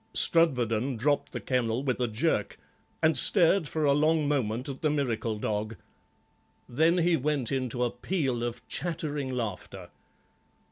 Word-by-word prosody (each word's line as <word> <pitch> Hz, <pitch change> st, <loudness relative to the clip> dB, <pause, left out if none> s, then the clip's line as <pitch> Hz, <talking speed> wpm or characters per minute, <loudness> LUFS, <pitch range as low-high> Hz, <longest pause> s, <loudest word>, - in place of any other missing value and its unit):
Strudwarden 125 Hz, -6 st, +2 dB
dropped 145 Hz, +5 st, 0 dB
the -, -, -5 dB
kennel 125 Hz, -1 st, -1 dB
with 130 Hz, -3 st, -1 dB
a 125 Hz, -, +1 dB
jerk, 110 Hz, -1 st, -1 dB, 0.5 s
and 160 Hz, 0 st, +4 dB
stared 180 Hz, -3 st, +4 dB
for 155 Hz, 0 st, -1 dB
a 140 Hz, -, +4 dB
long 155 Hz, +1 st, +2 dB
moment 125 Hz, -3 st, -1 dB
at 135 Hz, -2 st, -7 dB
the 155 Hz, -, +2 dB
miracle 120 Hz, -7 st, -1 dB
dog; 105 Hz, +1 st, -3 dB, 0.9 s
then 160 Hz, +8 st, +2 dB
he 175 Hz, 0 st, +3 dB
went 145 Hz, -4 st, -1 dB
into 130 Hz, -2 st, -2 dB
a 120 Hz, -, 0 dB
peal 130 Hz, -3 st, -2 dB
of 120 Hz, -1 st, -5 dB
chattering 150 Hz, -5 st, -3 dB
laughter. 95 Hz, -6 st, -5 dB
135 Hz, 145 wpm, -28 LUFS, 115-155 Hz, 0.9 s, and